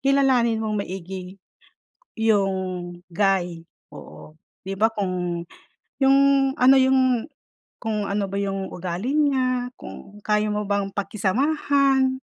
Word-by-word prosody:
kilalanin 255 Hz, -5 st, +2 dB
mong 215 Hz, -1 st, -1 dB
maigi 185 Hz, +1 st, -7 dB, 0.8 s
yung 205 Hz, -4 st, +2 dB, 0.6 s
guy 180 Hz, -2 st, +1 dB, 0.3 s
oo. -, -, -12 dB, 0.3 s
'Di 195 Hz, +1 st, -4 dB
ba, 220 Hz, -, +5 dB
kung 180 Hz, -3 st, -2 dB, 0.5 s
yung 270 Hz, 0 st, +4 dB, 0.4 s
ano 265 Hz, +2 st, +7 dB
yung 260 Hz, -2 st, +3 dB, 0.5 s
kung 215 Hz, -3 st, -3 dB
ano 200 Hz, 0 st, 0 dB
ba 200 Hz, -, -3 dB
yung 195 Hz, -1 st, -3 dB
ugali 180 Hz, +8 st, -3 dB
niya, 255 Hz, -4 st, +1 dB
kung 205 Hz, +1 st, -11 dB
kaya 210 Hz, 0 st, +1 dB
mo 210 Hz, 0 st, -2 dB
bang 200 Hz, 0 st, -1 dB
pakisamahan, 265 Hz, +6 st, +1 dB
210 Hz, 110 wpm, -23 LUFS, 195-260 Hz, 0.8 s, ano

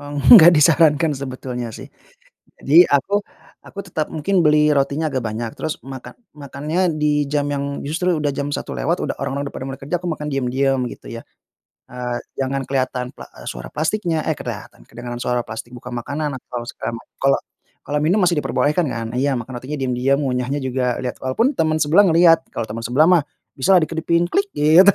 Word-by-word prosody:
enggak 145 Hz, -, +7 dB
disarankan 155 Hz, -1 st, +4 dB
sebetulnya 130 Hz, -3 st, -5 dB
sih. -, -, -9 dB, 0.7 s
Jadi 165 Hz, +6 st, +6 dB
aku, 200 Hz, +9 st, +2 dB, 0.4 s
aku 200 Hz, -, -14 dB
tetap 155 Hz, -3 st, -3 dB
mungkin 175 Hz, +4 st, +1 dB
beli 150 Hz, 0 st, +4 dB
rotinya 140 Hz, +3 st, 0 dB
agak 130 Hz, -2 st, -1 dB
banyak, 110 Hz, +1 st, -3 dB
terus 155 Hz, 0 st, -3 dB
makan 135 Hz, -1 st, -9 dB, 0.2 s
makannya 150 Hz, +5 st, -2 dB
di 150 Hz, -1 st, +1 dB
jam 145 Hz, -1 st, 0 dB
yang 140 Hz, 0 st, -3 dB
justru 170 Hz, +3 st, 0 dB
udah 145 Hz, -1 st, -1 dB
jam 140 Hz, +1 st, -3 dB
1.00 -, -, -4 dB
lewat, -, -, 0 dB
udah -, -, -2 dB
orang-orang 140 Hz, +1 st, -3 dB
udah -, -, -26 dB
pada 130 Hz, -, -6 dB
mereka 135 Hz, +1 st, -8 dB
kerja, 175 Hz, -, 0 dB
aku 180 Hz, -, -3 dB
makan 150 Hz, -1 st, -6 dB
diem-diem 135 Hz, 0 st, 0 dB
gitu -, -, -14 dB
ya. 115 Hz, -, -7 dB, 0.7 s
Eee, 125 Hz, -1 st, -4 dB, 0.2 s
jangan 135 Hz, 0 st, -1 dB
kelihatan 130 Hz, -2 st, -1 dB
pla -, -, -10 dB
e -, -, -14 dB
suara -, -, -7 dB
plastiknya 160 Hz, 0 st, -1 dB
eh -, -, +1 dB
kelihatan, -, -, -8 dB
kedengaran 120 Hz, +1 st, -7 dB
suara 125 Hz, -1 st, 0 dB
plastik, 110 Hz, +2 st, -7 dB
buka 125 Hz, +1 st, -9 dB
makanan 140 Hz, +4 st, -3 dB
atau 120 Hz, -1 st, -7 dB
stamp. 115 Hz, -, -5 dB, 0.2 s
Kalo, 135 Hz, 0 st, +3 dB, 0.5 s
kalo 150 Hz, -, -2 dB
minum 185 Hz, +6 st, +2 dB
masih 175 Hz, -3 st, +2 dB
diperbolehkan 150 Hz, +4 st, 0 dB
kan? 115 Hz, -3 st, -4 dB
Iya 140 Hz, 0 st, +1 dB
makan 120 Hz, +1 st, -6 dB
rotinya 145 Hz, +3 st, -5 dB
diam-diam, 130 Hz, +2 st, +1 dB
ngunyahnya 130 Hz, +1 st, -1 dB
juga 125 Hz, -1 st, -1 dB
lihat. 125 Hz, -, -4 dB
Walaupun 230 Hz, -, +1 dB
teman 155 Hz, -1 st, +2 dB
sebelah 175 Hz, +7 st, +5 dB
ngelihat, 165 Hz, 0 st, +5 dB
kalau 115 Hz, -, -3 dB
teman 115 Hz, +1 st, -5 dB
sebelah 140 Hz, +7 st, +3 dB
mah 170 Hz, -4 st, +5 dB, 0.3 s
bisalah 180 Hz, +7 st, +4 dB
dikedipin 170 Hz, +2 st, 0 dB
"klik" 400 Hz, +1 st, +1 dB
gitu. 165 Hz, +7 st, +6 dB
140 Hz, 185 wpm, -20 LUFS, 130-160 Hz, 0.7 s, enggak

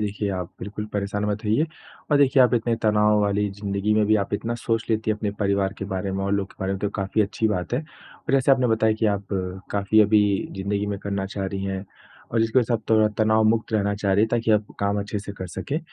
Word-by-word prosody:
देखिए 105 Hz, 0 st, -2 dB
आप 90 Hz, -2 st, -3 dB
बिल्कुल 105 Hz, +2 st, -5 dB
परेशान 100 Hz, 0 st, -2 dB
मत 105 Hz, +2 st, -2 dB
होइए 110 Hz, +9 st, +2 dB, 0.5 s
और 145 Hz, -, +5 dB
देखिए 135 Hz, -1 st, +5 dB
आप 125 Hz, -1 st, +4 dB
इतने 115 Hz, 0 st, +1 dB
तनाव 105 Hz, -1 st, +3 dB
वाली 105 Hz, 0 st, +1 dB
ज़िन्दगी 100 Hz, +1 st, -1 dB
में 105 Hz, 0 st, +3 dB
भी 110 Hz, -, +4 dB
आप 100 Hz, -, -8 dB
इतना 115 Hz, +3 st, -2 dB
सोच 115 Hz, -1 st, -1 dB
लेती 110 Hz, 0 st, +1 dB
हैं 110 Hz, -, 0 dB
अपने 105 Hz, -1 st, -2 dB
परिवार 100 Hz, -1 st, +1 dB
के 100 Hz, -, -4 dB
बारे 95 Hz, +1 st, -2 dB
में 95 Hz, 0 st, -2 dB
और 100 Hz, -, -1 dB
लोगों 100 Hz, -1 st, 0 dB
के -, -, -21 dB
बारे 95 Hz, 0 st, -1 dB
में, 95 Hz, -, -3 dB
तो 105 Hz, -, -1 dB
काफ़ी 100 Hz, +2 st, 0 dB
अच्छी 105 Hz, +2 st, -1 dB
बात 90 Hz, -2 st, -2 dB
है 130 Hz, -, +1 dB
और 155 Hz, -4 st, -10 dB
जैसे 135 Hz, 0 st, +3 dB
आपने 130 Hz, -1 st, +3 dB
बताया 110 Hz, -1 st, +3 dB
कि 110 Hz, -, +2 dB
आप 100 Hz, -1 st, -1 dB, 0.4 s
काफ़ी 100 Hz, +2 st, +3 dB
अभी 105 Hz, 0 st, +5 dB, 0.4 s
ज़िन्दगी 100 Hz, +1 st, -2 dB
में 100 Hz, -1 st, -3 dB
करना 100 Hz, -1 st, -3 dB
चाह 95 Hz, 0 st, -4 dB
रही 95 Hz, 0 st, -4 dB
हैं 95 Hz, 0 st, -3 dB, 0.5 s
और 115 Hz, -1 st, +2 dB
इसकी 115 Hz, +3 st, +2 dB
वज़ह 120 Hz, -1 st, +2 dB
से 110 Hz, 0 st, 0 dB
आप 105 Hz, -, +4 dB
त -, -, -17 dB
तनाव 110 Hz, 0 st, +3 dB
मुक्त 110 Hz, +1 st, +1 dB
रहना 100 Hz, -1 st, +1 dB
चाह 100 Hz, -1 st, 0 dB
रही 100 Hz, -, +4 dB
हैं -, -, -4 dB
ताकि 115 Hz, -1 st, 0 dB
आपको 105 Hz, -1 st, +1 dB
काम 100 Hz, 0 st, +1 dB
अच्छे 105 Hz, +1 st, -3 dB
से 100 Hz, 0 st, -7 dB
कर 95 Hz, -, -4 dB
सकें, 95 Hz, -, -3 dB
105 Hz, 255 wpm, -24 LUFS, 100-110 Hz, 0.5 s, और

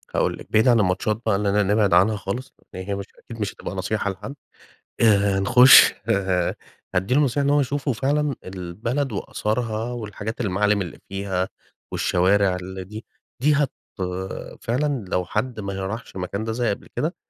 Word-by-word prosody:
هاقول -, -, +1 dB
لكِ. -, -, -13 dB
بعيد 110 Hz, +4 st, +4 dB
عن 120 Hz, -2 st, +5 dB
الماتشات 105 Hz, +3 st, 0 dB
بقي، 110 Hz, -3 st, +2 dB
إننا 105 Hz, +1 st, +2 dB
نبعد 100 Hz, -1 st, +2 dB
عنها 95 Hz, +5 st, +5 dB
خالص 110 Hz, +7 st, -5 dB, 0.2 s
لأن 95 Hz, 0 st, -6 dB
هي 100 Hz, -, -1 dB
مش 100 Hz, 0 st, -5 dB
أكيد 115 Hz, -1 st, -11 dB
مش 100 Hz, -1 st, -2 dB
هتبقى -, -, -7 dB
نصيحة 100 Hz, +2 st, -1 dB
لحد. 105 Hz, +9 st, -8 dB, 0.7 s
آآ، 100 Hz, -3 st, +4 dB
نخش 125 Hz, +6 st, +8 dB, 0.2 s
ه 95 Hz, -4 st, +1 dB, 0.4 s
أدي 95 Hz, +7 st, +1 dB
له 145 Hz, -, +4 dB
نصيحة 140 Hz, 0 st, +1 dB
إن -, -, +2 dB
هو 145 Hz, 0 st, +4 dB
يشوفوا 140 Hz, 0 st, -1 dB
فعلًا 140 Hz, +2 st, 0 dB
البلد 105 Hz, +9 st, -3 dB
وآثارها، 110 Hz, +2 st, -2 dB
والحاجات 110 Hz, -1 st, -5 dB
المعالم 105 Hz, 0 st, +1 dB
اللي 90 Hz, -, -6 dB
فيها، 95 Hz, -1 st, -2 dB, 0.4 s
والشوارع 95 Hz, +1 st, +2 dB
اللي 95 Hz, +1 st, -6 dB
دي 110 Hz, +4 st, -9 dB, 0.4 s
دي 150 Hz, +3 st, +4 dB
هت 145 Hz, -2 st, +1 dB, 0.9 s
فعلًا 130 Hz, -2 st, -1 dB
لو 90 Hz, 0 st, -1 dB
حد 120 Hz, +5 st, -2 dB
ما 100 Hz, -1 st, -4 dB
ه 95 Hz, -, -3 dB
راحش 110 Hz, +1 st, -7 dB
المكان 95 Hz, +3 st, -3 dB
ده 115 Hz, -, -2 dB
زي 120 Hz, +1 st, 0 dB
قبل 100 Hz, -, -4 dB
كده، -, -, -1 dB
105 Hz, 175 wpm, -23 LUFS, 95-120 Hz, 0.9 s, نخش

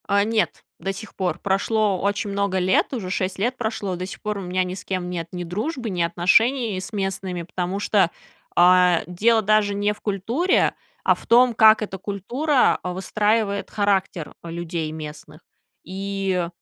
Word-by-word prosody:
А. 200 Hz, 0 st, +3 dB
Нет, 220 Hz, 0 st, -1 dB, 0.2 s
до 195 Hz, -, -3 dB
сих 215 Hz, +2 st, -10 dB
пор. 180 Hz, -3 st, -2 dB
Прошло 200 Hz, 0 st, +1 dB
очень 200 Hz, 0 st, -1 dB
много 200 Hz, -1 st, 0 dB
лет, 185 Hz, +8 st, +2 dB
уже 210 Hz, -8 st, -4 dB
6 185 Hz, 0 st, -2 dB
лет 240 Hz, +5 st, 0 dB
прошло. 220 Hz, -5 st, -3 dB
До 180 Hz, +1 st, -4 dB
сих 190 Hz, -, -9 dB
пор 210 Hz, -1 st, -3 dB
у -, -, -5 dB
меня 185 Hz, 0 st, 0 dB
ни 180 Hz, 0 st, -4 dB
с 190 Hz, -, -8 dB
кем 185 Hz, -2 st, -3 dB
нет 170 Hz, -2 st, -4 dB
ни 180 Hz, -1 st, -5 dB
дружбы, 225 Hz, -, -3 dB
ни 180 Hz, -3 st, -2 dB
отношений 200 Hz, +6 st, +2 dB
с 190 Hz, +4 st, -7 dB
местными, 190 Hz, -3 st, -3 dB
потому 180 Hz, +3 st, -3 dB
что, 205 Hz, -3 st, +2 dB, 0.5 s
а, 180 Hz, -1 st, +5 dB
дело 220 Hz, +6 st, +2 dB
даже 210 Hz, -1 st, +2 dB
не 205 Hz, +1 st, +1 dB
в -, -, -19 dB
культуре, 225 Hz, -, +1 dB, 0.3 s
а -, -, +4 dB
в -, -, -14 dB
том, 245 Hz, +1 st, +5 dB
как 220 Hz, 0 st, +6 dB
эта 200 Hz, -2 st, -4 dB
культура 245 Hz, -, +1 dB
выстраивает 200 Hz, +3 st, 0 dB
характер, 195 Hz, -5 st, 0 dB
э, 170 Hz, -, -7 dB
людей 165 Hz, -2 st, -4 dB
местных. 155 Hz, 0 st, -9 dB, 0.4 s
И 195 Hz, -1 st, -2 dB
195 Hz, 175 wpm, -23 LUFS, 180-215 Hz, 0.5 s, как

